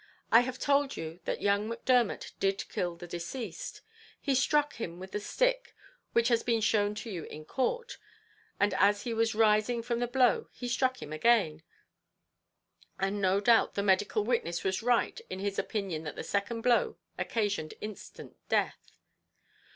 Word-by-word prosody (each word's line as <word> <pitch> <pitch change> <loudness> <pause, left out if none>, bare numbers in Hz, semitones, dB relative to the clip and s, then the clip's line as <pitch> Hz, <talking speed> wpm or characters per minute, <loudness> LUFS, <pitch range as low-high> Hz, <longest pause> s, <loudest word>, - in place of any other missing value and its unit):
I 230 - +9
have 250 +1 -2
told 280 0 +1
you 165 +2 -6
that - - -3
young 205 +2 +2
Macdermot 235 -1 +1
did 195 0 0
kill 175 -1 -2
the 175 +1 -9
deceased. 220 - -6 0.4
He 275 - 0
struck 295 +3 +2
him 175 -7 -5
with 190 +1 -9
the 210 - -2
stick - - 0 0.4
which 235 +1 +3
has 235 -1 +3
been 230 -2 +1
shown 210 -1 +2
to 215 +2 -6
you 170 -5 -5
in 155 0 -9
court, 470 - -2 0.6
and 205 -1 +3
as 205 +1 +4
he 235 - -2
was 225 0 +1
rising 220 +2 +3
from 235 0 -1
the 245 - 0
blow 250 0 +2
he 245 - -6
struck 255 +1 0
him 150 - -7
again; 160 -3 +3 1.4
and 195 +1 -1
no 190 +1 +3
doubt 225 +2 +4
the 200 - 0
medical 205 +2 +2
witness 205 -8 -1
was 190 +2 0
right 245 - +1
in - - -4
his 200 +1 -2
opinion 195 -7 -2
that 150 - -5
the - - -5
second 215 +3 -2
blow 240 0 +2 0.2
occasioned 205 -8 -1
instant 215 -2 -9
death. - - -1
215 Hz, 165 wpm, -30 LUFS, 195-245 Hz, 1.4 s, I